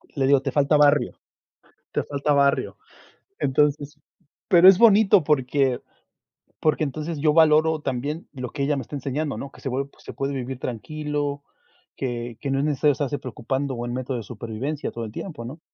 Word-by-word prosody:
Le 135 -2 +1
digo: 140 -1 +5
"te 135 - -3
falta 145 +2 +3
barrio, 145 0 +3 0.7
te - - 0
falta 145 +1 -1
barrio". 140 -1 +2 0.6
Entonces, 145 +1 0 0.5
pero, 180 -2 +8
es 190 -1 +8
bonito 210 -5 +6
porque 135 -3 +1 0.8
porque 155 0 +2
entonces 155 +2 -4
yo 150 +1 +3
valoro 160 0 +4
también 140 +5 -3
lo 125 -4 -5
que 140 - -3
ella 145 +1 +1
me 135 - -2
está 145 - -8
enseñando, 140 +2 -3
¿no? 140 - -6
Que - - -17
se 135 - -3 0.3
se - - -10
puede 140 +1 -3
vivir 130 -1 -5
tranquilo, 145 +4 -4 0.5
que 120 -3 -4
que 140 - -2
no 135 - +1
es 140 - 0
necesario 150 0 +2
estarse 145 +1 -3
preocupando, 130 +2 -3
o 120 0 -4
en 120 - -4
método 130 0 -3
de 115 - -5
supervivencia 120 +7 -5
todo 115 -1 -5
el 110 - -8
tiempo, 150 - -7
¿no? 140 +7 -8
140 Hz, 180 wpm, -24 LUFS, 130-150 Hz, 0.8 s, pero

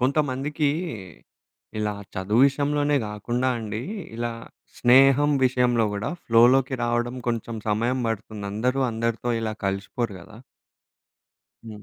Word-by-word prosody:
కొంతమందికి 140 +2 0 1.1
ఇలా 105 -1 -1 0.2
చదువు 100 +5 +1
విషయంలోనే 145 +1 +1
గాకుండా 120 +5 -2
అండి, 110 0 -4 0.3
ఇలా 120 0 -2 0.5
స్నేహం 135 +4 +5
విషయంలో 125 -2 +2
గూడా 100 +1 -3
ఫ్లోలోకి 125 +3 +4
రావడం 120 +1 0
కొంచెం 115 0 -2
సమయం 115 +5 +1
పడుతుంది. 110 -1 -4
అందరూ 125 +6 0
అందరితో 115 +1 -2
ఇలా 110 -1 -2
కలిసిపోరు 100 +3 -2
గదా! 110 +6 -14 1.3
హ్మ్. 105 -2 -10
120 Hz, 105 wpm, -24 LUFS, 110-130 Hz, 1.3 s, స్నేహం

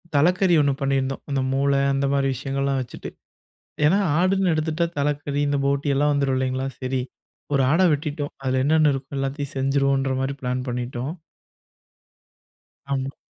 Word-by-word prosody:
தலக்கறி 180 +4 +4
ஒண்ணு 140 -1 +2
பண்ணிருந்தோம், 135 -1 0
அந்த 135 -1 0
மூளை 140 +1 +2
அந்த 135 0 0
மாரி 140 -1 +2
விஷயங்கள்லாம் 135 +1 -1
வச்சுட்டு. 120 - -8 0.8
ஏன்னா 185 +7 +4 0.2
ஆடுன்னு 185 0 +2
எடுத்துட்டா 155 +2 0
தலக்கறி, 145 0 -1
இந்த 145 - +1
போட்டி 140 +1 0
எல்லாம் 145 +2 +2
வந்துரும் 140 -2 +1
இல்லீங்களா? 130 0 -1
சரி 130 0 -1 0.5
ஒரு 135 - +3
ஆட 160 - +3
வெட்டிட்டோம் 145 0 -3
அது 130 - +1
என்னென்ன 155 0 +4
இருக்கோ 135 +1 -7
எல்லாத்தயும் 140 +1 -3
செஞ்சிருவோம்ன்ற 135 0 +1
மாரி 135 +1 -2
பிளான் 125 0 -2
பண்ணிட்டோம். 125 +3 -3 1.8
ஆமா. 135 0 -3
140 Hz, 140 wpm, -23 LUFS, 135-145 Hz, 1.8 s, தலக்கறி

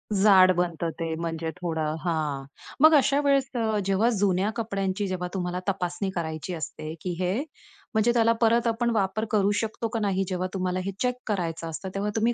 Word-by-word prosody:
जाड 190 -2 +7
बनतं 170 -1 -1
ते, 165 -1 -2
म्हणजे 165 0 -3
थोडं 160 -3 -1
हां. 155 -5 -2 0.4
मग 315 +1 +8
अशा 280 0 +4
वेळेस 275 -2 +2
अ, 220 -2 +1
जेव्हा 195 +4 +3
जुन्या 195 0 +2
कपड्यांची, 200 -3 -2
जेव्हा 180 -1 -3
तुम्हाला 180 -1 -2
तपासणी 190 0 -1
करायची 160 +1 -3
असते, 155 0 -5
की 180 - -3
हे 180 0 +1 0.6
म्हणजे 220 +2 +3
त्याला 230 -1 +4
परत 235 +1 +4
आपण 235 +1 +1
वापर 205 +2 0
करू 205 -1 +3
शकतो 225 +1 -2
का 225 0 -2
नाही, 195 -2 +1
जेव्हा 185 0 -1
तुम्हाला 185 -1 -1
हे 195 - -1
चेक 250 -1 +1
करायचं 165 -5 -2
असतं, 190 +4 -5
तेव्हा 205 +1 -1
तुम्ही 225 +2 +2
190 Hz, 180 wpm, -26 LUFS, 175-220 Hz, 0.6 s, मग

